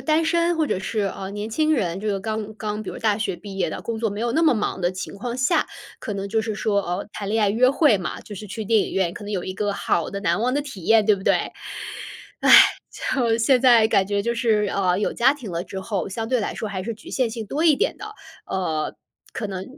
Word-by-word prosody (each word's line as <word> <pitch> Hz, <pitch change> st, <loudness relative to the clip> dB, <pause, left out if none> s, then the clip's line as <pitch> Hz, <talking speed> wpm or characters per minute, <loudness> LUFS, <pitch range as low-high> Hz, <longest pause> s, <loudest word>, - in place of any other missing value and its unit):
单 315 Hz, +1 st, +2 dB
身， 340 Hz, +1 st, +2 dB
或 320 Hz, -, +2 dB
者 280 Hz, -, -1 dB
是， 195 Hz, +3 st, -2 dB
呃， 190 Hz, -, -6 dB
年 210 Hz, +2 st, -5 dB
轻 310 Hz, +6 st, +2 dB
人， 185 Hz, -, -1 dB
就 215 Hz, -, -6 dB
是 200 Hz, -2 st, 0 dB
刚 215 Hz, 0 st, -4 dB
刚 210 Hz, 0 st, -4 dB
比 215 Hz, -, -7 dB
如 -, -, -5 dB
说 -, -, -9 dB
大 215 Hz, -1 st, +2 dB
学 210 Hz, -, -1 dB
毕 195 Hz, +3 st, -9 dB
业 175 Hz, -3 st, +1 dB
的， -, -, -6 dB
工 230 Hz, -1 st, -3 dB
作 225 Hz, 0 st, 0 dB
没 205 Hz, +1 st, -5 dB
有 235 Hz, +1 st, 0 dB
那 315 Hz, -, +1 dB
么 320 Hz, -5 st, +4 dB
忙 210 Hz, -3 st, -2 dB
的 175 Hz, 0 st, +1 dB
情 185 Hz, +1 st, -6 dB
况 240 Hz, +4 st, -4 dB
下， 260 Hz, +7 st, +2 dB, 0.3 s
可 210 Hz, -, -5 dB
能 200 Hz, 0 st, -4 dB
就 220 Hz, +2 st, +1 dB
是 220 Hz, 0 st, -3 dB
说， 205 Hz, -1 st, +1 dB
呃， 180 Hz, +1 st, -4 dB
谈 200 Hz, -, -5 dB
恋 220 Hz, +1 st, +1 dB
爱 205 Hz, -, +3 dB
约 245 Hz, +5 st, +4 dB
会 275 Hz, -6 st, +4 dB
嘛。 180 Hz, -, -5 dB
就 205 Hz, -, -10 dB
是 210 Hz, -, -8 dB
去 210 Hz, +2 st, -5 dB
电 220 Hz, +1 st, +3 dB
影 -, -, -3 dB
院， 185 Hz, -3 st, +1 dB
可 205 Hz, -, -9 dB
能 205 Hz, -, -5 dB
有 185 Hz, -3 st, -1 dB
一 185 Hz, -, -4 dB
个 205 Hz, +2 st, -1 dB
好 200 Hz, -, 0 dB
的 200 Hz, -, -5 dB
难 200 Hz, -, +1 dB
忘 250 Hz, +3 st, +1 dB
的 290 Hz, -, +1 dB
体 265 Hz, -11 st, -9 dB
验， 225 Hz, -1 st, +5 dB
对 210 Hz, -1 st, +4 dB
不 190 Hz, -, -10 dB
对？ -, -, +5 dB, 1.1 s
唉， -, -, +3 dB, 0.7 s
就 235 Hz, -4 st, +2 dB
现 250 Hz, +2 st, +4 dB
在 240 Hz, -4 st, +6 dB
感 190 Hz, -3 st, +3 dB
觉 205 Hz, 0 st, 0 dB
就 235 Hz, -, 0 dB
是， 225 Hz, -3 st, +2 dB
呃， 185 Hz, -2 st, +1 dB
有 205 Hz, -, 0 dB
家 255 Hz, +3 st, +4 dB
庭 255 Hz, -9 st, -8 dB
了 170 Hz, 0 st, -3 dB
之 190 Hz, -, -6 dB
后， 190 Hz, -3 st, -3 dB
相 225 Hz, +3 st, -4 dB
对 255 Hz, 0 st, +2 dB
来 205 Hz, -, -3 dB
说 215 Hz, -, -4 dB
还 190 Hz, -2 st, -4 dB
是 230 Hz, +4 st, -4 dB
局 220 Hz, -, -13 dB
限 255 Hz, -3 st, +1 dB
性 225 Hz, -1 st, -5 dB
多 300 Hz, +9 st, -1 dB
一 320 Hz, -3 st, +6 dB
点 465 Hz, -, 0 dB
的。 425 Hz, 0 st, -9 dB, 0.3 s
呃， 165 Hz, -5 st, -2 dB, 0.4 s
可 220 Hz, -, -3 dB
能 190 Hz, -2 st, -5 dB
215 Hz, 290 characters per minute, -23 LUFS, 195-235 Hz, 1.1 s, 在